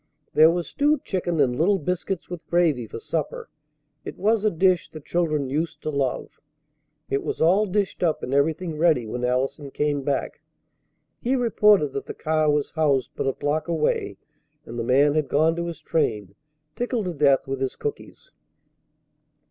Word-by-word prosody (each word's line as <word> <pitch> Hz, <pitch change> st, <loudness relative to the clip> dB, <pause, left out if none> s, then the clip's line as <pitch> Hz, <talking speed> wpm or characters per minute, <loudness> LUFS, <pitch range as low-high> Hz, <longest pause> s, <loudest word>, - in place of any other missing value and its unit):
There 155 Hz, +1 st, +7 dB
was 170 Hz, 0 st, -1 dB
stewed 295 Hz, +1 st, +1 dB
chicken 175 Hz, -4 st, -2 dB
and 130 Hz, -4 st, +3 dB
little 190 Hz, +9 st, +3 dB
biscuits 180 Hz, +2 st, -3 dB
with 175 Hz, -2 st, -7 dB
gravy 160 Hz, -9 st, +1 dB
for -, -, -8 dB
supper. 155 Hz, +6 st, -4 dB, 0.5 s
It -, -, -8 dB
was 215 Hz, +2 st, +1 dB
a 215 Hz, -, +4 dB
dish 185 Hz, 0 st, +2 dB
the 155 Hz, -, -9 dB
children 155 Hz, -2 st, -1 dB
used 155 Hz, +3 st, -3 dB
to 155 Hz, -, -2 dB
love. 140 Hz, -3 st, -2 dB, 0.7 s
It 135 Hz, -, +1 dB
was -, -, -4 dB
all 190 Hz, +6 st, +4 dB
dished 200 Hz, +1 st, -1 dB
up 165 Hz, -3 st, 0 dB
and 125 Hz, -, -3 dB
everything 155 Hz, +3 st, 0 dB
ready 155 Hz, -8 st, +3 dB
when 120 Hz, +3 st, -5 dB
Allison 135 Hz, +3 st, -1 dB
came 145 Hz, 0 st, -1 dB
back. 140 Hz, 0 st, -2 dB, 0.8 s
He 255 Hz, +3 st, 0 dB
reported 210 Hz, -, +3 dB
that 140 Hz, -, -5 dB
the -, -, -6 dB
car 155 Hz, -1 st, +1 dB
was 145 Hz, -1 st, 0 dB
housed 145 Hz, -5 st, +1 dB
but -, -, -2 dB
a -, -, +3 dB
block 150 Hz, +5 st, -2 dB
away, 160 Hz, -3 st, -1 dB, 0.5 s
and 120 Hz, +1 st, -7 dB
the -, -, -1 dB
man 140 Hz, +5 st, +4 dB
had 155 Hz, -1 st, 0 dB
gone 160 Hz, +3 st, +2 dB
to 170 Hz, 0 st, -3 dB
his 170 Hz, -, -6 dB
train, 105 Hz, -, -1 dB, 0.4 s
tickled 245 Hz, -3 st, -2 dB
to 180 Hz, -, -3 dB
death 140 Hz, -2 st, +3 dB
with 135 Hz, 0 st, -4 dB
his 135 Hz, -, -2 dB
cookies. 440 Hz, +3 st, -7 dB
155 Hz, 175 wpm, -24 LUFS, 140-175 Hz, 0.8 s, There